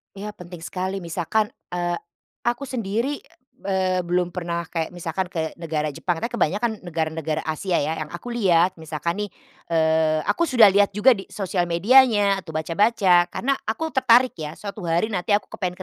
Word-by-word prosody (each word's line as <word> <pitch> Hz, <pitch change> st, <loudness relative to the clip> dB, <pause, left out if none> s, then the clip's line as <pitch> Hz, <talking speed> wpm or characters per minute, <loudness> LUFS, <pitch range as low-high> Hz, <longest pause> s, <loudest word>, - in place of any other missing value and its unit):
Iya 205 Hz, +2 st, -6 dB
penting 175 Hz, -4 st, -11 dB
sekali. 185 Hz, +2 st, -4 dB
Misalkan, 175 Hz, +6 st, -1 dB, 0.2 s
eee, 175 Hz, -1 st, -1 dB, 0.5 s
aku 240 Hz, +3 st, 0 dB
sendiri, 250 Hz, +1 st, -2 dB, 0.5 s
eee, 185 Hz, -1 st, +1 dB
belum 180 Hz, 0 st, 0 dB
pernah 170 Hz, -1 st, -3 dB
kayak 165 Hz, +1 st, -3 dB
misalkan 175 Hz, +2 st, -3 dB
ke 160 Hz, -3 st, -3 dB
negara 155 Hz, -2 st, -2 dB
Jepang, 165 Hz, +4 st, -2 dB
katanya 235 Hz, -, -2 dB
kebanyakan 210 Hz, +8 st, +1 dB, 0.2 s
negara-negara 160 Hz, -1 st, -2 dB
Asia 160 Hz, +4 st, -2 dB
ya, 155 Hz, +2 st, -2 dB
yang 155 Hz, -, -4 dB
aku 175 Hz, +10 st, -7 dB
lihat, 185 Hz, -6 st, +2 dB
misalkan 170 Hz, +6 st, -3 dB
nih, -, -, -21 dB, 0.4 s
eee, 160 Hz, -1 st, +2 dB
aku 340 Hz, -, +1 dB
sudah 230 Hz, -8 st, +7 dB
lihat 200 Hz, 0 st, +3 dB
juga 210 Hz, +6 st, +6 dB
di 195 Hz, -5 st, -2 dB
sosial 185 Hz, -3 st, -2 dB
medianya 205 Hz, +2 st, +4 dB
atau 160 Hz, -4 st, -10 dB
baca-baca 180 Hz, +2 st, +3 dB
karena 270 Hz, +9 st, -1 dB
aku 320 Hz, +9 st, -2 dB
tertarik 255 Hz, -2 st, +5 dB
ya, 155 Hz, 0 st, -5 dB
suatu 200 Hz, -3 st, -7 dB
hari 170 Hz, +7 st, +1 dB
nanti 200 Hz, +1 st, +1 dB
aku 205 Hz, -, -3 dB
kepengen 180 Hz, -1 st, -3 dB
180 Hz, 165 wpm, -23 LUFS, 165-210 Hz, 0.5 s, sudah